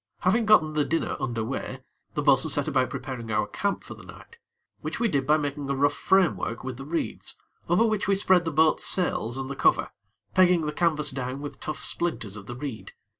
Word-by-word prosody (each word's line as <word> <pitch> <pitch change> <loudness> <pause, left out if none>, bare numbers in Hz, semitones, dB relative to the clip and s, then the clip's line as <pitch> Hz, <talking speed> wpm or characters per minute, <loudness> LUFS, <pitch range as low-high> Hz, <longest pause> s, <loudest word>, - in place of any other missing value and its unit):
Having 215 +5 +2
gotten 155 -8 +5
the 150 -1 +2
dinner 165 +3 -1
under 120 -4 -2
way, 130 +2 -5 0.3
the 150 - -1
bo'sun 140 +1 +4
set 145 0 +1
about 130 -4 +1
preparing 125 -4 -6
our 105 -1 +1
camp 200 - -2
for - - -9
the - - -13
night, 465 - -14 0.4
which - - -5
we 235 - +2
did 140 -9 0
by 150 +1 +5
making 145 -1 -3
a 140 - 0
rough 140 +2 +2
framework 180 -11 +1
with 130 -1 -5
the 135 - -8
reeds, 165 +3 -3 0.3
over 180 +7 +4
which 215 -4 0
we 195 - +3
spread 185 -2 +3
the 165 - -2
boat's 155 +1 +3
sails 130 -9 +1
and 135 0 -4
the 140 - -5
cover, - - +2 0.4
pegging 180 -2 +5
the 150 -1 -3
canvas 150 -3 +1
down 130 0 -4
with 145 0 -7
tough 155 - -5
splinters 135 - -1
of 100 -1 -10
the 120 - -6
reed. 130 -3 -7
145 Hz, 215 wpm, -26 LUFS, 130-175 Hz, 0.4 s, gotten